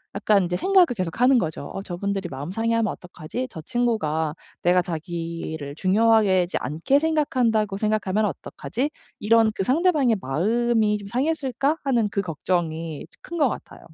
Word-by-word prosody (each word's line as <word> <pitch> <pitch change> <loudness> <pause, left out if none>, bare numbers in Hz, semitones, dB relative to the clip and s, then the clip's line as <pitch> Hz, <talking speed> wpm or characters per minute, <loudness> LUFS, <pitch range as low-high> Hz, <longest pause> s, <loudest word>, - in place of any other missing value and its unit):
약간 200 -1 +3
이제 180 0 -1
생각을 375 - +5
계속하는 235 +8 +2
거죠. 155 -6 -3
어 - - -4
'저분들이 195 0 -3
마음 140 +4 -6
상해하면 225 0 0
어떡하지?' 180 +8 -6
'저 160 - -8
친구가 160 -9 -1 0.3
내가 180 +1 +3
자기를 165 -3 -5
중요하게 200 0 +3
지 175 - -3
않게 160 - +1
생각한다고 250 -10 +1
생각하면 215 -1 0
어떡하지?' 255 +7 -3 0.3
이런 225 +1 +4
그 - - -1
'상대방의 280 - +2
마음이 215 - +1
좀 200 - -9
상했을까?' 275 +3 0
하는 245 -6 +2
이제 200 - +1
걱정이 165 -2 -3 0.2
큰 340 - -6
것 285 -4 +4
같아요. - - -8
205 Hz, 360 characters per minute, -24 LUFS, 175-240 Hz, 0.3 s, 생각을